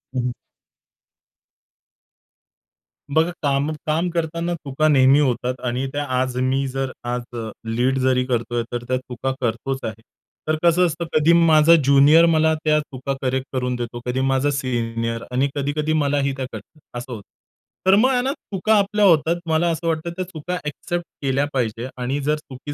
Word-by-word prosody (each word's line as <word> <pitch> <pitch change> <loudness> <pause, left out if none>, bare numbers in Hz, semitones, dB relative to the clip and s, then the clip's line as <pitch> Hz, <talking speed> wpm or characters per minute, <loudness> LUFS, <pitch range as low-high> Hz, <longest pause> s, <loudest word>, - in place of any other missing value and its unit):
हं. 125 -1 0 2.8
बघा, 160 +3 +3
काम 140 +1 +1
काम 160 +3 0
करताना 170 +1 -2
चुका 155 0 -1
नेहमी 135 -1 +5
होतात 125 -2 0
आणि 125 +2 -1
त्या 145 0 -1 0.2
आज 130 -1 -1
मी 135 +1 0
जर 135 0 -3
आज 120 0 -2 0.4
लीड 125 +4 0
जरी 130 0 +2
करतोय, 120 -1 -1
तर 120 0 -3
त्या 130 0 +1
चुका 130 +1 -4
करतोच 125 +3 -2
आहे. 110 0 -5 0.5
तर 155 - +2
कसं 175 +1 +4
असतं, 170 0 -2
कधी 155 +2 +4
माझा 165 -1 +6
ज्युनियर 140 +4 +6
मला 160 -1 +3
त्या 150 -1 +3
चुका 135 -2 -5
करेक्ट 130 0 -1
करून 125 -1 -1
देतो, 120 0 -5
कधी 125 +1 -1
माझा 135 +1 +1
सीनियर 115 -4 -2
आणि 130 +3 +2
कधी-कधी 150 +2 -1
मलाही 145 -2 +1
त्या 135 - -4
कळतात 155 - -11 0.2
असं 125 +1 -7
होतं. 110 - -7 0.7
तर 190 - +7
मग 245 +6 +4
आहे 250 -1 +2
ना 265 - 0
चुका 210 - -1
आपल्या 210 0 +2
होतात. 165 -2 +4
मला 160 +2 +2
असं 165 +1 -3
वाटतं 160 +1 -1
त्या 185 0 -3
चुका 180 0 -5
एक्सेप्ट 175 +4 -4 0.2
केल्या 135 +1 +1
पाहिजेत 120 -1 -2
आणि 125 +3 -2
जर 150 +2 +1
चुकी 145 -1 -9
140 Hz, 165 wpm, -21 LUFS, 125-160 Hz, 2.8 s, तर